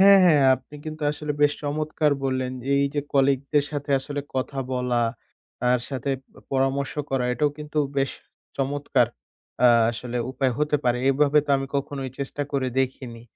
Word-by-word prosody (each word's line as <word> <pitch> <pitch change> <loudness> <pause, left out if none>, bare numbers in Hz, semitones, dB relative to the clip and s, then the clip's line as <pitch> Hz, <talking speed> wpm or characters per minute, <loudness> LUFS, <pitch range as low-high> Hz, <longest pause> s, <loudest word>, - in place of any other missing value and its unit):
হ্যাঁ, 195 0 +9
হ্যাঁ 150 -5 +5
আপনি 150 - -14
কিন্তু 155 0 -6
আসলে 150 0 -3
বেশ 145 - +5
চমৎকার 150 0 0
বললেন। 130 -1 -1 0.2
এই 140 - +3
যে 145 - +1
colleague 135 -1 +3
দের 145 -2 +4
সাথে 145 -1 -4
আসলে 145 +1 -4
কথা 135 +1 -2
বলা, 125 -1 +1 0.6
তার 125 0 +2
সাথে 135 0 -3
প - - -52 0.3
পরামর্শ 135 +1 0 0.2
করা 135 -2 +1
এটাও 150 +3 +1
কিন্তু 150 0 -4 0.2
বেশ 135 - +1 0.5
চমৎকার, 140 +1 +1 0.6
আ - - +8 0.2
আসলে 120 +1 -5
উপায় 130 -1 0
হতে 150 0 +2
পারে। 125 0 +2
এভাবে 145 +2 +4
তো - - -2
আমি 135 - -3
কখনোই 135 -1 -3
চেষ্টা 140 +1 -2
করে 135 -2 0
দেখিনি। 125 -3 -4
140 Hz, 165 wpm, -24 LUFS, 130-145 Hz, 0.6 s, হ্যাঁ